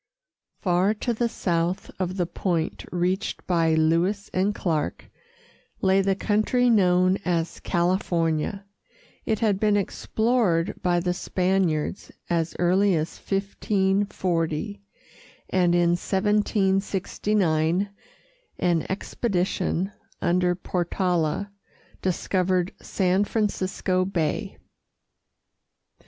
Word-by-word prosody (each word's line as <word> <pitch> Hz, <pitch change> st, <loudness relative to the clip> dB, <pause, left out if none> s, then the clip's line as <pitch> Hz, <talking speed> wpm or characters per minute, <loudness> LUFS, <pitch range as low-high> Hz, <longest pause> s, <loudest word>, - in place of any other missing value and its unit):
Far 185 Hz, +3 st, +2 dB
to 240 Hz, +3 st, -1 dB
the 235 Hz, +1 st, 0 dB
south 175 Hz, -1 st, -1 dB
of 185 Hz, 0 st, -2 dB
the 175 Hz, -, +1 dB
point 170 Hz, -2 st, -2 dB
reached 180 Hz, +4 st, -1 dB
by 165 Hz, -3 st, +2 dB
Lewis 170 Hz, +6 st, +1 dB
and 195 Hz, +3 st, +1 dB
Clark 160 Hz, -5 st, -2 dB, 0.7 s
lay 190 Hz, 0 st, +3 dB
the 195 Hz, 0 st, +1 dB
country 220 Hz, +5 st, +2 dB
known 185 Hz, -2 st, +4 dB
as 170 Hz, -2 st, -1 dB
California. 175 Hz, +1 st, 0 dB, 0.6 s
It 220 Hz, -1 st, 0 dB
had 205 Hz, -4 st, +2 dB
been 210 Hz, -1 st, +3 dB
explored 205 Hz, -3 st, +1 dB
by 175 Hz, -2 st, +2 dB
the 180 Hz, 0 st, 0 dB
Spaniards 180 Hz, -3 st, -1 dB, 0.2 s
as 165 Hz, -1 st, 0 dB
early 185 Hz, +2 st, +3 dB
as 160 Hz, +1 st, -2 dB
1540, 195 Hz, -2 st, -1 dB, 0.7 s
and 175 Hz, -2 st, +3 dB
in 175 Hz, -1 st, +3 dB
1769 195 Hz, -2 st, +1 dB, 0.7 s
an 170 Hz, -3 st, +1 dB
expedition 190 Hz, -2 st, -1 dB, 0.3 s
under 180 Hz, 0 st, +2 dB
Portala 180 Hz, 0 st, -1 dB, 0.5 s
discovered 185 Hz, 0 st, 0 dB
San 190 Hz, +1 st, +1 dB
Francisco 190 Hz, -3 st, 0 dB
Bay. 170 Hz, -5 st, -2 dB
185 Hz, 90 wpm, -25 LUFS, 175-200 Hz, 0.7 s, known